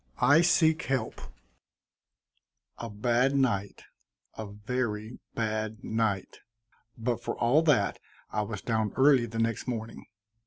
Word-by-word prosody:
I 145 +6 +5
SEEK 160 -2 +4
HELP 135 -1 -2 1.6
A 115 - -5
bad 120 +6 +1
night, 100 -8 0 0.5
a 110 - -6
very 110 +1 -3 0.2
bad 110 -1 -2
night, 110 -4 -1 0.6
but 120 0 -1
for - - -3
all 125 +7 +4
that 145 -11 +2 0.3
I 105 - 0
was 105 -2 -5
down 110 -3 0
early 130 -3 +5
the 115 0 -7
next 115 +2 -1
morning. 115 -2 -5
115 Hz, 120 wpm, -29 LUFS, 110-130 Hz, 1.6 s, I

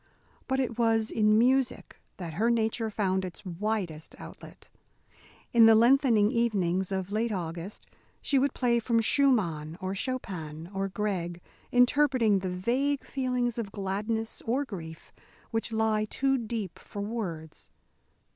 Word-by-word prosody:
But 265 0 0
it 240 -3 -2
was 225 -1 +2
in 215 -1 +3
music 255 +2 +1 0.2
that 170 -4 -6
her 220 +8 +1
nature 225 -1 0
found 190 -3 0
its 185 +2 -7
widest 180 -3 -3
outlet. - - -12 0.9
In 230 -1 +8
the 225 - +7
lengthening 235 -2 +4
evenings 195 -6 0
of 190 0 -3
late 220 +2 0
August 175 0 -5 0.3
she 275 - +2
would 275 0 0
play 240 -2 +2
from 230 0 +1
Schumann, 195 - +1
or 190 0 -3
Chopin, 180 - -5
or 195 0 -1
Grieg, 185 -4 -3 0.3
interpreting 245 -4 +4
the 185 0 -3
vague 250 +10 0
feelings 250 -3 -1
of 205 -4 -4
gladness 210 +3 -3
or 265 +5 +1
grief 160 - -9 0.4
which 225 0 -2
lie 220 -1 +1
too 270 +5 0
deep 225 -7 -4
for 205 - -8
words. 180 -8 -5
220 Hz, 135 wpm, -28 LUFS, 190-240 Hz, 0.9 s, In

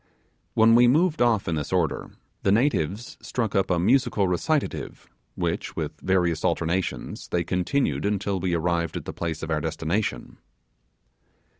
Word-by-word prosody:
When 115 +1 +6
we 120 +1 +7
moved 155 +3 +3
off 115 -4 +3
in 85 - 0
this 75 -2 -3
order, - - 0 0.3
the 95 - +2
natives 110 - 0
struck 115 -4 -2
up 95 -2 +1
a 90 - +2
musical 115 +1 +2
recitative, 140 - -2 0.3
which - - -2
with - - -5
various 90 -4 +1
alternations, 85 +2 -1
they 85 - 0
continued 90 - 0
until 100 -1 -1
we 90 -1 0
arrived 85 -1 0
at - - -7
the - - -5
place 80 -2 -4
of 80 - -4
our 75 -1 +1
destination. 80 - -2
95 Hz, 150 wpm, -25 LUFS, 85-115 Hz, 0.3 s, we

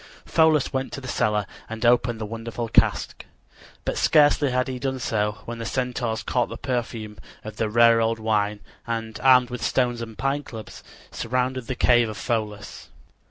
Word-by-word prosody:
Pholus 160 -4 +3
went 130 0 -2
to - - -4
the 130 - -9
cellar 105 -4 0 0.2
and 115 +1 -4
opened 120 -1 +3
the 110 - -3
wonderful 115 +2 -5
cask. - - +1 0.6
But - - -1
scarcely 145 -1 +4
had 125 0 0
he 130 -1 -4
done 130 0 -2
so 105 -3 -1
when 120 0 -6
the - - -4
Centaurs 125 -3 -2
caught 125 -2 0
the - - -7
perfume 115 -5 -4 0.2
of 110 -1 -8
the 110 - 0
rare 115 +1 +5
old 115 0 +1
wine, 105 -2 0 0.3
and, 115 -1 -4
armed 125 -2 +5
with 125 -2 -5
stones 120 -2 +1
and 115 -2 -8
pine 135 +1 0
clubs, 110 -6 -10 0.3
surrounded 125 +1 -2
the 130 - -3
cave 120 -2 +4
of 110 - -7
Pholus. 105 -4 -4
120 Hz, 175 wpm, -24 LUFS, 110-125 Hz, 0.6 s, rare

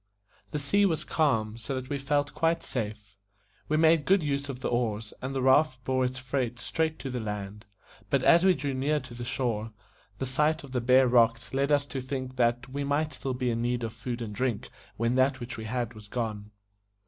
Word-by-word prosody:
The 150 - -3
sea 150 +9 +2
was 160 -5 -1
calm; 115 -8 +1
so 120 +4 -4
that 130 +1 -5
we 140 - -1
felt 145 +1 0
quite 165 +1 +1
safe. 105 -4 -5 0.5
We 155 - +2
made 160 -1 +4
good 195 -2 +4
use 140 -1 -1
of 130 -2 -5
the - - -1
oars, 110 -3 -1
and 135 +1 -4
the 130 - 0
raft 130 -1 +4
bore 130 +1 +1
its 130 +1 -1
freight 125 -2 -2
straight 160 +5 -1
to 135 - -4
the 125 - -2
land; 105 -1 -5 0.4
but 140 -2 +2
as 170 +1 +6
we 190 -1 +5
drew 140 -3 -2
near 145 +3 +1
to 130 -3 -10
the 120 0 -6
shore 115 -3 -2 0.4
the 135 - -2
sight 150 +5 +1
of 140 - -11
the 125 -2 0
bare 130 +2 +5
rocks 120 0 +3
led 140 +2 +1
us 145 -1 +3
to 135 -1 -5
think 130 0 -4
that 120 0 +2
we 140 +2 -3
might 145 +2 0
still 135 -1 -3
be 125 -1 0
in 115 0 -1
need 120 0 0
of 110 -1 -3
food 120 -1 -4
and 105 -2 -6
drink 125 +1 -2 0.3
when 115 +2 +1
that 130 0 +3
which 120 -1 -6
we 110 - -6
had 120 0 -2
was 105 -1 -12
gone. 105 -2 -3
130 Hz, 220 wpm, -28 LUFS, 115-140 Hz, 0.5 s, as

